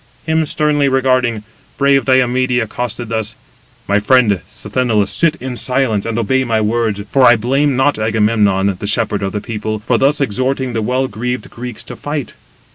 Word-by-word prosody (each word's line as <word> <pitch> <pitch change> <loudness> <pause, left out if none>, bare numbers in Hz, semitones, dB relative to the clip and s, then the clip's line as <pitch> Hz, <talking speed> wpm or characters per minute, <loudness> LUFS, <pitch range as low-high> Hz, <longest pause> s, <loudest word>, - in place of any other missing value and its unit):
Him 160 -1 +1
sternly 145 -2 +1
regarding, 130 -4 +1 0.3
brave 140 -2 +3
Diomede 130 -1 +2
accosted 120 0 -4
thus: 110 -1 -3 0.5
"My 100 +1 +2
friend 125 +2 +3
189 100 -5 -1
Sthenelus, 110 -6 -1
sit 165 -2 +2
in 130 -4 -6
silence, 125 -5 0
and 115 -1 -2
obey 130 +4 +1
my 115 -3 0
words; 110 -1 -1
for 135 - +3
I 120 -1 +7
blame 135 +5 +1
not 135 0 +1
Agamemnon, 105 -3 +1
the 100 - -4
shepherd 105 -1 +1
of 95 0 -2
the 105 - -4
people, 110 -1 -4
for 120 -1 +2
thus 140 +2 +2
exhorting 130 +1 -1
the 115 - -1
well 130 +4 0
greaved 125 +2 -4
Greeks 120 -1 -7
to - - -9
fight. 145 -2 -5
120 Hz, 175 wpm, -16 LUFS, 110-130 Hz, 0.5 s, I